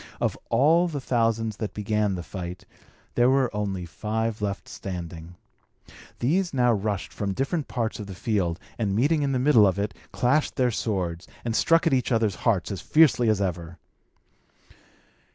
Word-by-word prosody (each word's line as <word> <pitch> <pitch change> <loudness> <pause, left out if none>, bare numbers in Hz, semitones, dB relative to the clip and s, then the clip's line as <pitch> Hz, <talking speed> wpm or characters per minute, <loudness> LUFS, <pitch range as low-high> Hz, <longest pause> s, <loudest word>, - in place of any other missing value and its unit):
Of - - 0
all 165 +6 +4
the 150 -4 -4
thousands 115 -4 0
that 105 -2 -5
began 105 -1 0
the 90 - -5
fight, 90 0 -7 0.5
there 120 +1 +4
were 130 -4 +2
only 100 -4 -2
five 110 +5 -3
left 100 -1 -3
standing. 85 -2 -7 0.8
These 170 +6 0
now 125 -2 +4
rushed 100 -2 -2
from 100 -2 -3
different 140 +3 -1
parts 115 -3 -2
of 105 - -6
the 95 - -8
field, 95 -5 -1 0.2
and, 100 -4 0
meeting 145 +7 +2
in 140 -1 0
the 130 - +1
middle 125 -5 +5
of 95 - 0
it, 105 +1 -2 0.2
clashed 140 +5 +1
their 125 -2 +2
swords, 95 -6 -2 0.2
and 115 -1 -1
struck 165 +6 +3
at 165 - +3
each 130 0 +1
other's 110 -3 +2 0.2
hearts 95 -4 0
as 95 - -4
fiercely 145 -7 +4
as 105 -2 +2
ever. 85 -3 -3
110 Hz, 170 wpm, -25 LUFS, 95-130 Hz, 0.8 s, middle